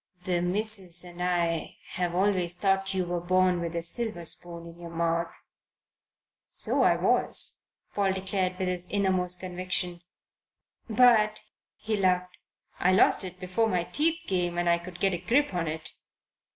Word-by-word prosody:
"The 180 -1 -1
missus 185 -1 0
and 175 0 -10
I 170 -2 -1
have 175 -1 -2
always 185 -2 +1
thought 195 +1 0
you 185 -1 -1
were 175 0 -3
born 185 0 +1
with 170 0 -5
a 170 - -2
silver 215 -1 -2
spoon 170 +1 0
in 170 0 -13
your 170 -1 -9
mouth." 170 0 -2 1.1
"So - - +3
I - - +4
was," - - +4 0.3
Paul 200 -2 +1
declared 190 -1 -1
from 185 - -2
his 180 -1 -3
innermost 185 -3 +1
conviction. 180 -1 -2 0.9
"But," 220 -2 +4 0.3
he 220 0 -3
laughed, 180 -2 0 0.4
"I 185 +1 +3
lost 190 - +4
it 185 -1 -8
before 185 +5 -1
my 180 -3 0
teeth 320 - +2
came 175 -2 -1
and 175 0 -1
I 170 0 +3
could 175 0 -11
get 195 -1 +2
a 175 - -2
grip 245 +8 +1
on 170 -2 -2
it." 155 0 -3
180 Hz, 160 wpm, -27 LUFS, 175-195 Hz, 1.1 s, I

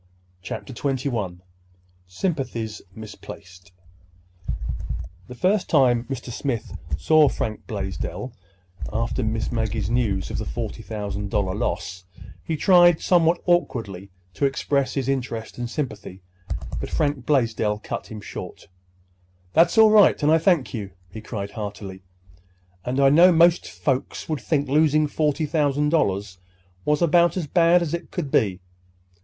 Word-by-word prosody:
CHAPTER 130 +7 -6
XXI 120 -9 -2 0.7
SYMPATHIES 115 - -3
MISPLACED 90 -4 -11 1.6
The 125 - -9
first 185 - +1
time 125 -5 +4
Mr. 130 -1 -6
Smith 120 -1 -3 0.2
saw 155 - +5
Frank 110 -1 -4
Blaisdell, 100 +1 -4 0.6
after 115 +4 -1
Miss 110 -1 -1
Maggie's 110 -2 -1
news 105 -7 0
of - - -3
the - - -3
forty - - -5
thousand 105 -2 -4
dollar 100 -2 0
loss, 90 -4 -3 0.4
he 160 - -2
tried, 175 0 +6
somewhat 170 -1 +3
awkwardly, 115 - 0 0.2
to 140 - 0
express 135 -1 -1
his 135 -3 -1
interest 120 -4 -3
and 120 -1 -3
sympathy. 105 - -5 0.6
But - - -5
Frank 145 -5 -1
Blaisdell 110 -6 +1
cut - - -5
him 110 -1 -8
short. - - -9 0.8
"That's 170 +5 +4
all 220 -1 +8
right, 210 -7 +5
and 150 - +4
I 160 - +5
thank 170 -6 +2
you," 100 -5 -5 0.2
he 110 - -8
cried 100 -3 -5
heartily. 100 -3 -7 0.8
"And 125 +2 -2
I 135 0 +6
know 175 +5 +7
most 170 +1 +4
folks 135 -2 -2
would 155 -4 -2
think 145 -3 0
losing 155 +2 +3
forty 150 +1 0
thousand 150 -1 +1
dollars 100 - 0 0.5
was 150 +2 +2
about 170 +2 +4
as 175 - -1
bad 170 +3 +4
as 165 -1 -4
it 170 - -4
could 155 -7 -4
be. 95 -6 +1
130 Hz, 140 wpm, -23 LUFS, 105-155 Hz, 1.6 s, all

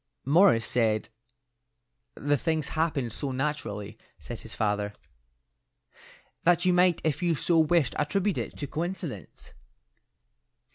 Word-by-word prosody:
"Morris 150 - +5
said 110 -3 +1 1.1
the 145 +1 +1
things 160 0 -1
happened 155 -8 -1
so 140 - -3
naturally," 115 -7 -3 0.2
said 120 - -8
his 115 - -9
father, 105 -1 -1 1.5
"that 175 +1 +3
you 180 - +4
might 180 -1 +4
if 155 +2 0
you 170 -2 +2
so 165 +3 +2
wished 160 -4 +3
attribute 190 +7 0
it - - -5
to 145 - -3
coincidence." 160 - -5
150 Hz, 115 wpm, -28 LUFS, 115-170 Hz, 1.5 s, Morris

